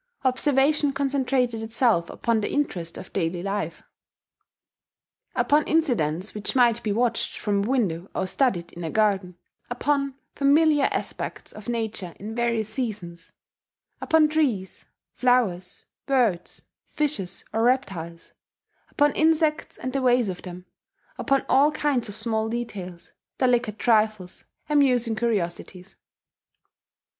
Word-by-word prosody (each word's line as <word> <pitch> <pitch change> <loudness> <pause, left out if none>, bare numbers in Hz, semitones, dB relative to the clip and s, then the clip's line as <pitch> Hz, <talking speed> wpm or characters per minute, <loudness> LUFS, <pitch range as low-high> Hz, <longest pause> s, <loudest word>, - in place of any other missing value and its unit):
Observation 275 +2 +3
concentrated 265 -4 0
itself 225 -6 +1
upon 230 -2 0
the - - -2
interest 180 - -2
of - - -9
everyday 175 -1 -1
life, 195 -5 -3 1.5
upon 300 +1 +3
incidents 215 - +1
which 210 +5 -4
might 235 -2 +4
be 215 - -2
watched 230 +2 0
from 205 -2 0
a 200 - -1
window, 195 -9 0
or - - 0
studied 185 -4 0
in 175 - -8
a 165 - -3
garden, 195 -3 +1 0.3
upon 275 +2 0 0.2
familiar 290 +1 +4
aspects - - -4
of 215 +2 -9
nature 220 -7 -3
in 215 +3 -6
various 235 -2 0
seasons, 210 -8 -5 0.7
upon 320 -1 +4
trees, 255 - -1 0.3
flowers, 220 -8 +1 0.2
birds, 235 -11 0 0.3
fishes, 275 -12 -2
or 225 - +1
reptiles, 195 -10 -1 0.6
upon 290 0 +3
insects 315 -1 +1
and 255 - -5
the 275 - 0
ways 245 -4 +3
of 180 - -5
them, 180 0 -9 0.5
upon 275 -2 +1
all 285 +3 +4
kinds 290 -7 0
of 205 - -8
small 220 0 -1
details, 195 -7 -6 0.3
delicate 245 -4 +1
trifles, 215 -6 +1 0.2
amusing 255 -6 +3
curiosities. 195 -4 -3
230 Hz, 120 wpm, -25 LUFS, 190-270 Hz, 1.5 s, might